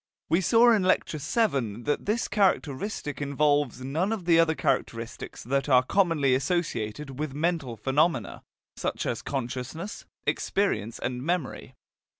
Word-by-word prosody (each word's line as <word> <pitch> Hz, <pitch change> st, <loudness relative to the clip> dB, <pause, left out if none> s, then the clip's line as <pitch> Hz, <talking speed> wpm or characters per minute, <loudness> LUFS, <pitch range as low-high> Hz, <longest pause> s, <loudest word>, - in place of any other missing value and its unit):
We 170 Hz, +3 st, +3 dB
saw 230 Hz, +6 st, +5 dB
in 220 Hz, -3 st, +4 dB
Lecture 185 Hz, -4 st, +1 dB
VII 135 Hz, -, 0 dB
that 145 Hz, +7 st, -1 dB
this 220 Hz, +3 st, 0 dB
characteristic 180 Hz, -5 st, 0 dB
involves 145 Hz, -2 st, +1 dB
none 160 Hz, +10 st, -1 dB
of 210 Hz, -6 st, -3 dB
the 165 Hz, -1 st, +5 dB
other 165 Hz, -1 st, +3 dB
characteristics 115 Hz, -5 st, -2 dB
that 135 Hz, +4 st, -1 dB
are 125 Hz, -1 st, +6 dB
commonly 155 Hz, -4 st, +2 dB
associated 135 Hz, -3 st, -2 dB
with 150 Hz, -3 st, -3 dB
mental 155 Hz, -7 st, -1 dB
phenomena, 135 Hz, -, 0 dB, 0.3 s
such -, -, -3 dB
as -, -, -2 dB
consciousness, 135 Hz, -, -5 dB, 0.2 s
experience 115 Hz, -, 0 dB
and 125 Hz, 0 st, -3 dB
memory. 165 Hz, -1 st, -3 dB
145 Hz, 135 wpm, -27 LUFS, 130-175 Hz, 0.3 s, are